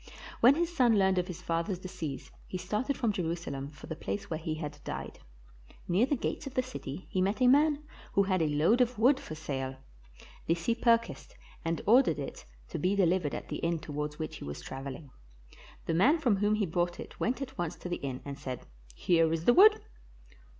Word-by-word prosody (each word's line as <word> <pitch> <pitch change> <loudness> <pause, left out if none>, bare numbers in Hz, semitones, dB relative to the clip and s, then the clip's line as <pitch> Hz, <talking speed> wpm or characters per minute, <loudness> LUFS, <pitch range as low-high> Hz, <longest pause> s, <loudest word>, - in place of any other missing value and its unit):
When 250 +4 +7
his 345 +1 -1
son 240 -7 +4
learned 190 -1 +3
of 180 - -2
his 180 0 -7
father's 170 +2 -1
decease, 175 -6 -6 0.2
he 185 - -4
started 240 +9 -2
from 230 -4 +1
Jerusalem 165 -6 -3
for 150 - -12
the 160 - -5
place 100 -2 -5
where 160 - -1
he 160 -1 -3
had 150 -2 -6
died. - - -6 0.7
Near 190 +8 +3
the 285 - +1
gates 280 - -3
of 270 - -8
the 255 - +2
city 185 - -7
he 185 - +1
met 200 +5 +1
a 255 - +4
man 290 +3 +4 0.3
who 200 -1 +4
bad 185 -2 +1
a 160 - +2
load 160 +12 +3
of 245 -1 +1
wood 260 +5 +4
for 155 - -7
sale. 135 -4 -4 0.7
This 165 0 0
he 230 - +3
purchased 230 0 +1 0.3
and 165 0 -2
ordered 225 - +5
it 140 -2 -6 0.2
to - - -4
be 185 +5 +1
delivered 180 -5 +2
at - - -7
the - - -3
inn 170 0 0
towards 150 -1 -5
which 155 -1 -5
he - - -9
was 70 0 -6
traveling. 135 +1 -7 0.7
The - - 0
man 255 - +5
from 245 -10 +2
whom 205 +2 +2
he 215 -1 +1
bought 175 +1 -1
it - - -9
went 250 +3 0
at 275 -1 -6
once 175 -1 -2
to - - -8
the 175 - -2
inn 130 -2 -5
and 140 -1 -6
said, 130 -2 -6 0.3
"Here 165 - +3
is 165 0 -2
the 240 - +7
wood." 425 - +7
180 Hz, 215 wpm, -30 LUFS, 155-235 Hz, 0.7 s, When